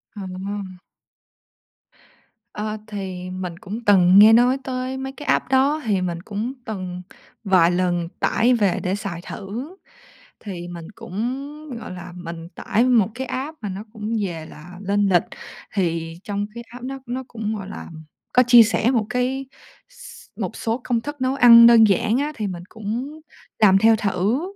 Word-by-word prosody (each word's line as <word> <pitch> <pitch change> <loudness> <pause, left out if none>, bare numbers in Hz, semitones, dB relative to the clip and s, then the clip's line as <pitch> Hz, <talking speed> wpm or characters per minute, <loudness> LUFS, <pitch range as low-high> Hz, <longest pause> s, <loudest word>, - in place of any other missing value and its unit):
À. 190 0 -6 1.8
Ơ, 215 +1 -4
thì 190 -3 -6
mình 185 -2 -5
cũng 215 +6 -7
từng 190 -1 +6
nghe 220 +2 +9
nói 245 +3 +5
tới 255 0 -3
mấy 265 0 -5
cái 295 +2 -10
app - - +1
đó, 275 +4 +3
thì 200 -4 +1
mình 170 -2 -3
cũng 215 +7 -4
từng 185 -4 -5 0.4
vài 185 -4 +4
lần 175 -1 0
tải 245 +3 +3
về 205 -6 +2
để 185 +1 0
xài 195 -5 -5
thử. 235 - -7 0.6
Thì 180 -5 -7
mình 170 -2 -8
cũng, 270 - -5
gọi - - -8
là, 180 0 -9
mình 170 -2 -8
tải 235 +4 +1
một 235 -6 +4
cái 265 +1 -4
app 290 +5 -4
mà 210 - -4
nó 195 +3 -6
cũng 215 0 -4
về 165 -3 -5
là 175 +4 -12
lên 200 +1 +1
lịch, 175 -3 +4 0.5
thì 165 -4 -1
trong 205 0 -3
cái 235 - -7
app 245 +1 -11
nó 270 +1 -5
nó 255 +2 -4
cũng, 220 -1 -4
gọi 195 -2 -7
làm, 160 -1 -9 0.3
có 250 - +6
chia 240 -1 +9
sẻ 225 +2 +1
một 230 -5 +1
cái 255 +2 -1 0.4
s - - -13 0.2
một - - -3
số 230 +2 -2
công 235 -2 0
thức 290 +2 -7
nấu 260 +1 +1
ăn 235 -3 +9
đơn 235 -1 +7
giản 215 +4 +2
á, 290 +2 -1
thì 215 -2 -3
mình 175 -2 -6
cũng 235 +8 -5 0.4
làm 195 -3 +6
theo 225 +3 +5
thử. 210 - 0
210 Hz, 175 wpm, -22 LUFS, 185-250 Hz, 1.8 s, nghe